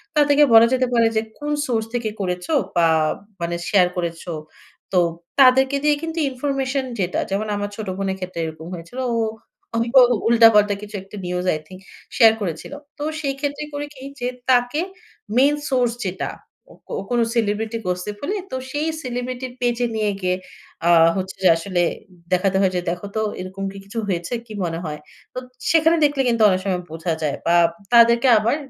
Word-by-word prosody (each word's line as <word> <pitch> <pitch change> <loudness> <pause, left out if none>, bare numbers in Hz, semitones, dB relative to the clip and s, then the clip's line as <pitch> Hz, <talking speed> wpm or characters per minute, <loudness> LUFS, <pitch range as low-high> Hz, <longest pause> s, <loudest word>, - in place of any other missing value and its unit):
তাদেরকে 295 0 +5
বলা 225 0 +9
যেতে 255 0 +2
পারে 230 -1 +4
যে 220 - +3 0.2
কোন 295 0 -4 0.2
সোর্স 225 -3 0
থেকে 240 -2 -1
করেছো 180 - -2 0.2
বা 170 -1 +4 0.5
মানে 170 0 -1
শেয়ার 185 -3 +5
করেছো? 170 0 -4 0.6
তো 185 - +5 0.4
তাদেরকে 265 +1 +6
দিয়ে 300 0 +4
কিন্তু 325 0 -4
ইনফরমেশন 270 0 -2
যেটা 180 -1 0
যেমন, 200 +3 -1
আমার 205 0 -3
ছোট 215 -1 -6
বোনের 195 -1 -2
ক্ষেত্রে 185 -2 -6
এরকম 160 0 -8
হয়েছিলো। 175 +9 -7
ও - - 0 0.6
অভিক 230 +1 0 0.4
উল্টা-পাল্টা 225 -3 +6
কিছু 210 0 -9
একটা 195 +2 -13
নিউজ, 180 0 -2
আই 155 - -2
থিংক 185 +1 -11 0.4
শেয়ার 225 -3 +7
করেছিলো। 180 - -5 0.2
তো 290 - -5 0.2
সেইক্ষেত্রে 285 0 -3
করি 290 0 -3
কি, 260 - -12 0.2
যে 245 - -2 0.2
তাকে 245 +3 +3 0.6
মেইন 280 +3 +5
সোর্স 250 -3 +2
যেটা, 185 0 -3 0.6
কো - - -7 0.2
কোনো 240 -1 +2
সেলিব্রিটি 220 0 0
গসিপ 180 +3 -3
হলে, 355 +9 -2 0.2
তো - - -3 0.2
সেই 295 +3 -1 0.2
সেলিব্রিটির 250 0 -4
পেজে 245 0 +1
নিয়ে 215 -1 +1
গিয়ে 180 0 +1 0.5
আ - - +5 0.3
হচ্ছে 190 0 -4
যে - - +6
আসলে 175 +1 -1 0.5
দেখাতে 185 +1 +2
হয় 190 -2 +3
যে 180 - 0
দেখো 175 +3 -4
তো 220 - +1 0.2
এরকম 185 +1 -6
কি 195 - -11
কিছু 205 +4 -5
হয়েছে 175 +1 -2
কি 220 - -10
মনে 165 -1 -2
হয়? 150 -1 -5 0.3
তো - - -10 0.3
সেখানে 325 +1 +4
দেখলে 285 -2 +1
কিন্তু 230 -1 +1
অনেক 185 -1 +1
সময় 185 -2 0
বোঝা 165 +1 -2
যায়। 150 -2 -1
বা 170 - +3 0.4
তাদেরকে 235 +1 +6
আবার 220 +5 +2
220 Hz, 175 wpm, -21 LUFS, 185-255 Hz, 0.6 s, বলা